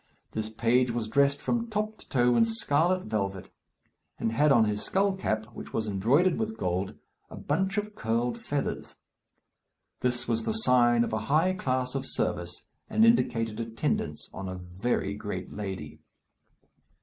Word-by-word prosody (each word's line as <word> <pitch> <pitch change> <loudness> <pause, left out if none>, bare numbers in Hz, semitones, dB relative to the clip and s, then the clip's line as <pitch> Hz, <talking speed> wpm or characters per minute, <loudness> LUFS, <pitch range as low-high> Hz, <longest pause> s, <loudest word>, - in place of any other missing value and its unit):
This 110 0 -3
page 120 +3 +2
was 115 -2 -2
dressed 140 +4 +3
from 235 -1 -1
top 215 0 -2
to - - -14
toe 125 -2 +3
in - - +5
scarlet 185 -5 +1
velvet, 95 -3 -3 0.7
and 115 - -1
had 145 +6 +3
on 115 -4 +6
his 105 -1 -1
skull 195 +1 +1
cap, 110 - -1
which - - -9
was 110 - 0
embroidered 125 - +2
with 220 0 -2
gold, 90 +2 -2 0.3
a - - -9
bunch 190 +7 -1
of 210 0 -2
curled 115 - -1
feathers. 145 -1 -3 1.0
This 125 -1 +2
was 115 -1 +1
the - - -1
sign 120 - +5
of 120 - -3
a 110 - +1
high 165 +6 +3
class 130 -7 -1
of 135 -1 -3
service, 85 0 -2 0.3
and 220 - +4
indicated 115 - +2
attendance 115 0 -2
on 95 -1 -5
a 95 - -5
very 95 +3 -2
great 105 -3 -5
lady. 95 -7 -6
120 Hz, 160 wpm, -28 LUFS, 110-170 Hz, 1.0 s, on